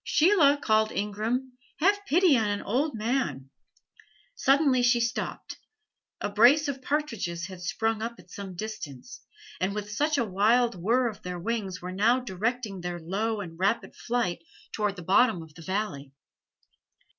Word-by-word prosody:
"Sheila," 310 -4 +4
called 220 -4 +2
Ingram, 225 +6 -2 0.2
"have 405 +4 +2
pity 345 -1 +5
on 220 -3 +2
an 205 0 -2
old 270 +6 0
man!" 210 - -2 0.8
Suddenly 275 - +3
she 245 0 +4
stopped. 235 +1 -3 0.6
A - - -1
brace 240 +9 +5
of 270 -2 -4
partridges 230 - -2
had 185 -1 -9
sprung 215 +4 -1
up 235 +1 -3
at 180 0 -18
some 195 -2 -7
distance, 215 - -7 0.4
and 195 +2 -1
with 210 0 -4 0.3
a 240 - +1
wild 225 +5 +3
whirr 230 +8 +1
of 215 -2 -6
their 180 -3 -5
wings 195 -2 -3
were 180 - -4
now 220 +7 +3
directing 220 -2 -3
their 175 0 -4
low 205 +6 -2
and 165 -3 -9
rapid 200 +5 0
flight 230 -8 -2 0.3
toward 210 -2 -1
the 180 - -9
bottom 195 0 +3
of 160 -1 -15
the 165 - -13
valley. 165 -7 -3
215 Hz, 155 wpm, -27 LUFS, 185-250 Hz, 0.8 s, pity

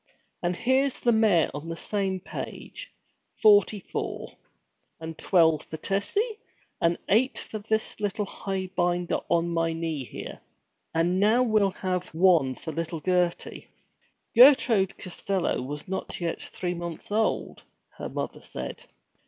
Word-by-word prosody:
'And 175 0 0
here's 260 +7 +1
the 240 - +3
mayor 215 -7 +4
on 145 +3 -6
the 165 - -3
same 195 +1 -1
page - - -7 0.5
forty 205 -1 +5
four! - - -5 0.6
And 160 0 -6
twelve 165 -3 +3
for 160 - -7
Tessie, 405 - -1 0.4
and 170 0 +3
eight 245 +6 +3
for 215 - -5
this 220 +1 -1
highbinder 190 -4 -2
on 170 0 +2
my 165 -1 0
knee, 160 -4 -3
here! - - -8 0.5
And 175 +3 +2
now 220 +5 +4
we'll 215 -4 +3
have 185 -1 -3
one 165 -7 +4
for 160 - -6
little 165 0 -3
Gertie!' 180 0 -1 0.7
Gertrude 230 -6 +6
Costello 185 +1 -2
was 145 +3 -6
not 190 +1 -4
yet 170 -2 -2
three 180 -1 -4
months 170 +1 -7
old, 220 +1 0 0.4
her - - -4
mother - - -4
said. - - -7
185 Hz, 130 wpm, -27 LUFS, 170-210 Hz, 0.7 s, Gertrude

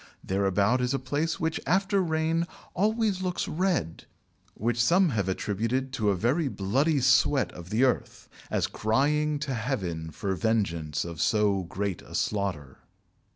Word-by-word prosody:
Thereabout 100 +5 +1
is 125 +2 0
a - - +2
place 145 +5 -2
which, 160 0 -1
after 195 +3 +2
rain, 165 0 0 0.3
always 210 -1 +1
looks 180 -1 -2
red, 170 - -1 0.5
which 120 +2 0
some 180 +6 +4
have 100 -7 -1
attributed 115 +7 -1
to 110 -5 +1
a 100 - +2
very 130 - +1
bloody 135 +8 +1
sweat 130 +2 +3
of 85 0 -11
the 110 +6 +2
earth, 130 - 0 0.2
as - - +1
crying 145 +7 +1
to 140 -3 -2
Heaven 95 - -3
for 95 +5 -3
vengeance 85 -9 -1
of 85 -3 -5
so 105 -3 +2
great 95 +1 -3
a - - -10
slaughter." 90 -10 -2
120 Hz, 150 wpm, -27 LUFS, 100-155 Hz, 0.5 s, some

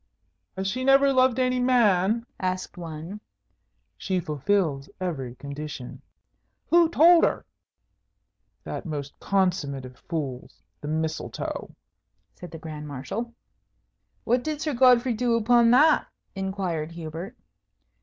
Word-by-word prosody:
"Has 190 - -2
she 240 +7 -2
never 275 +1 +5
loved 255 -1 +3
any 255 -1 +1
man?" 230 -3 +3
asked 185 0 -3
one. 170 +4 -7 0.8
"She 190 -2 -1
fulfils 150 -2 -1
every 135 -10 -4
condition." 140 -2 -7 0.7
"Who 340 -1 +6
told 335 +1 +6
her?" - - +1 1.2
"That - - -6
most 145 -3 -6
consummate 180 -9 0
of 130 0 -11
fools, 140 -7 -6 0.2
the 145 - -6
Mistletoe," 160 +1 -4 0.6
said 180 - -10
the 165 - -9
Grand 150 -2 -8
Marshal. 170 - -5 0.9
"What 245 +1 +1
did 305 -1 -3
Sir 305 -1 -2
Godfrey 250 -1 +5
do 235 +1 +1
upon 230 +1 +4
that?" 295 +6 +5 0.3
inquired 190 -5 -3
Hubert. 165 +2 -7
190 Hz, 115 wpm, -25 LUFS, 155-245 Hz, 1.2 s, Who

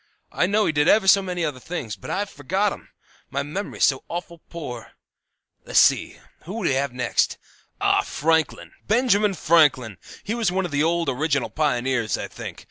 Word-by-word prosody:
I 180 - +1
know 210 +2 +2
he - - +2
did 150 0 +1
ever 210 0 +4
so 195 +1 +7
many 180 -3 -2
other 135 -4 -4
things, 130 -8 -5
but - - -11
I've 200 0 -2
forgot 190 +8 -1
'em; - - -13 0.4
my 140 +1 -2
memory's 185 +8 -1
so 135 -2 +1
awful 170 -1 -6
poor. 125 -10 -8 0.7
"Less - - -2
see! - - +4 0.3
Who 205 +6 -5
have 140 -3 +1
we 125 - -15
next? 125 - +1 0.4
Ah, - - +3
Franklin! 160 +1 -1 0.2
Benjamin 210 -3 +2
Franklin! 145 - +3 0.2
He 215 - -3
was 230 -6 0
one 190 0 0
of 175 - -5
the 145 0 +1
old 170 +1 +1
original 140 0 0
pioneers, 125 - 0
I - - -5
think. - - -8
165 Hz, 180 wpm, -23 LUFS, 140-190 Hz, 0.7 s, so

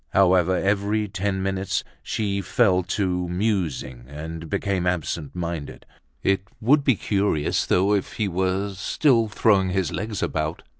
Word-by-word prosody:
However, 95 -1 +4
every 105 +2 +1
ten 95 0 -2
minutes, 95 -1 -1 0.2
she 100 -2 -2
fell 95 0 +3
to 90 -1 -1
musing 90 - -2
and 80 +3 -7
became 95 +1 -1
absent 85 -3 -2
minded. 85 -4 -5 0.4
It 95 -1 +2 0.2
would 140 +6 +4
be 130 -4 +4
curious 100 -7 0
though, 95 +3 +3
if 100 -2 -1
he 110 - -1
were 95 +2 -1
still 115 +5 +2
throwing 105 -3 +3
his 95 -1 0
legs 105 +1 -3
about. 80 +1 -2
95 Hz, 140 wpm, -24 LUFS, 90-100 Hz, 0.4 s, However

